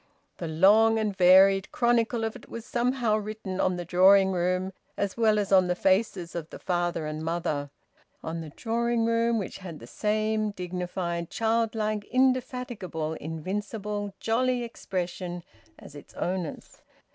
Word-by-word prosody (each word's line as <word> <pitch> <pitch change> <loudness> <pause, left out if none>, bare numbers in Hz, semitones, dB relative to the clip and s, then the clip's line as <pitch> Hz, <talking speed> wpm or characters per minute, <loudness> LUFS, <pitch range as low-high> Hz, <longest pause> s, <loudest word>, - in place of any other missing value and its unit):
The 170 - -4
long 210 +8 +5
and 215 -2 -1
varied 190 +1 +6
chronicle 235 -1 +1
of 225 +1 -2
it 250 - -13
was 230 0 -7
somehow 240 -2 +1
written 215 -3 -5
on 185 -1 +1
the 175 - -5
drawing 190 +3 +5
room 185 +1 0 0.2
as 200 -2 -1
well 220 -2 +3
as 205 -1 -1
on 185 -2 +5
the 180 - 0
faces 190 -2 +1
of 165 -2 -5
the - - -9
father 175 -2 -1
and 155 0 -4
mother 160 -3 -2 0.5
on 165 +1 -4
the 160 - -7
drawing 230 +6 -1
room 230 0 +2
which 195 -2 -5
had 175 -5 -8
the 115 - -11
same 215 - 0
dignified, 180 -2 -4
childlike, 220 -2 0
indefatigable, 250 -10 -1
invincible, 200 +6 -4
jolly 245 +2 +1
expression 180 -5 -4 0.3
as - - -13
its 145 - -13
owners. 180 -3 -4
195 Hz, 145 wpm, -27 LUFS, 175-225 Hz, 0.5 s, varied